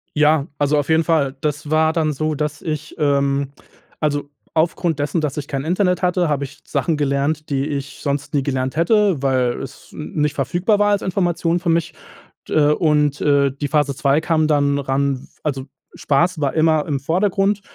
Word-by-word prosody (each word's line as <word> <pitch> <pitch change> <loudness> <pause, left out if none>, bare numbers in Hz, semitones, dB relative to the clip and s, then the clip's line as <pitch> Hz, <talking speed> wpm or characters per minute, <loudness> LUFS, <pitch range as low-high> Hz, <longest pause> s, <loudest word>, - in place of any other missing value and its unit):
Ja, 150 0 +3
also, 145 +1 +2
auf 145 0 -1
jeden 160 +1 +4
Fall! 150 -5 +1
Das 150 0 -3
war 160 +1 +3
dann 155 -2 0
so, 155 +2 -1
dass 150 +1 -3
ich 155 -1 -5
ähm, 140 -2 +1 0.5
also, 145 -2 -1 0.3
aufgrund 165 -1 +1
dessen, 150 +3 0
dass 150 -1 -2
ich 145 - -4
kein 135 -2 -3
Internet 180 +3 +1
hatte, 180 -1 +1
habe 145 -2 0
ich 145 +3 -9
Sachen 165 -4 -1
gelernt, 145 +2 -1
die 135 -1 0
ich 145 -2 -5
sonst 140 0 -3
nie 140 - +1
gelernt 130 -1 -2
hätte, 185 -1 +2
weil 130 -3 +1
es 135 0 -10
n 150 - -8
nicht 150 -1 +1
verfügbar 175 - +1
war 205 0 +3
als 205 - +1
Information 175 -2 0
für 170 - -2
mich, 165 0 +1 0.5
d - - -5 0.2
und, 150 -2 +1
äh, 140 -1 +3
und 140 +3 -14
die 145 - 0
Phase 145 -1 +1
2 140 +1 +2
kam 160 -2 +1
dann 145 -2 +2
ran 135 0 0
w - - -15 0.2
also, 135 -3 -2 0.3
Spaß 170 +5 +1
war 140 -2 0
immer 155 -1 +2
im 140 -3 -2
Vordergrund, 195 +5 +1
150 Hz, 195 wpm, -20 LUFS, 140-165 Hz, 0.5 s, jeden